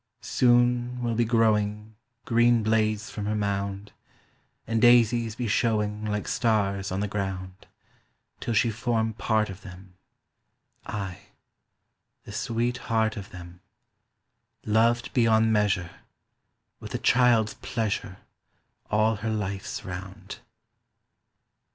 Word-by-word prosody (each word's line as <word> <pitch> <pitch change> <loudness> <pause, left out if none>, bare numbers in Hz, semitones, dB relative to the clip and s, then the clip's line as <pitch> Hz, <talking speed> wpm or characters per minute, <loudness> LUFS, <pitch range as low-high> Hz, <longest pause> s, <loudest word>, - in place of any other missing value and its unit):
Soon 120 0 +2
will 120 -1 0
be 120 +1 +1
growing 110 -2 +1 0.3
Green 120 -1 +3
blades 110 0 0
from 105 -1 -5
her 105 - 0
mound, 100 -1 -3 0.7
And 115 0 -1
daises 120 -2 +4
be 120 -1 -3
showing 105 -1 0
Like 105 -1 -2
stars 100 -5 0
on 95 +1 -2
the 105 - -1
ground, 95 -2 -5 0.7
Till 115 - -2
she 115 +2 +3
form 110 0 -1
part 110 -1 0
of 95 +1 -11
them— 95 -1 -12 0.9
Ay—the 100 0 -11
sweet 120 +2 -1
heart 110 -1 +1
of 100 -1 -8
them, 90 0 -11 1.0
Loved 115 +2 +2
beyond 110 -3 +3
measure 95 -5 +1 0.9
With - - -7
a - - +1
child's 120 -3 +3
pleasure 105 -5 -3 0.7
All 110 +1 +2
her 110 +2 -3
life's 100 -3 -4
round. 95 +2 -8
110 Hz, 110 wpm, -26 LUFS, 100-115 Hz, 1.0 s, daises